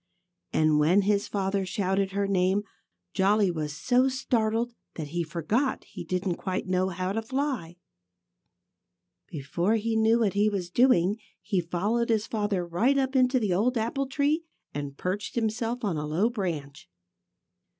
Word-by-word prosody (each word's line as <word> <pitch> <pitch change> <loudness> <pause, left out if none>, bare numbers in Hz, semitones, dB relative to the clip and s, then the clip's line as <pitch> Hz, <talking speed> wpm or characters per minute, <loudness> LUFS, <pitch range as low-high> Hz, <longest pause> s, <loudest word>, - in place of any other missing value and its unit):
And 155 -1 +3
when 175 +7 +4
his 200 0 +1
father 195 -1 -1
shouted 190 +1 -1
her 200 0 0
name 190 +1 +2 0.5
Jolly 200 0 +3
was 150 -3 -4
so 255 +1 +3
startled 235 -2 0 0.2
that 155 -3 -5
he 170 +3 -2
forgot 170 - -1
he - - -9
didn't 180 -1 -2
quite 185 0 -3
know 185 0 +1
how 185 +1 -2
to 225 +3 -1
fly. 245 - -3 1.5
Before 170 +8 -1
he 225 +1 -1
knew 220 +1 +4
what 205 -4 +2
he 205 +1 +3
was 185 -4 -3
doing, 210 -4 +3 0.2
he 195 -4 -1
followed 205 +8 -1
his 220 -1 +2
father 205 -5 -1
right 220 +12 +2
up 265 0 0
into 255 0 +4
the 210 -6 0
old 235 +7 +1
apple 240 +5 -1
tree 290 +4 +1 0.3
and 145 -1 -5
perched 195 +3 -3
himself 230 +1 -1
on 190 -7 0
a 150 0 -3
low 185 +10 +1
branch. 155 - -4
200 Hz, 155 wpm, -27 LUFS, 175-230 Hz, 1.5 s, when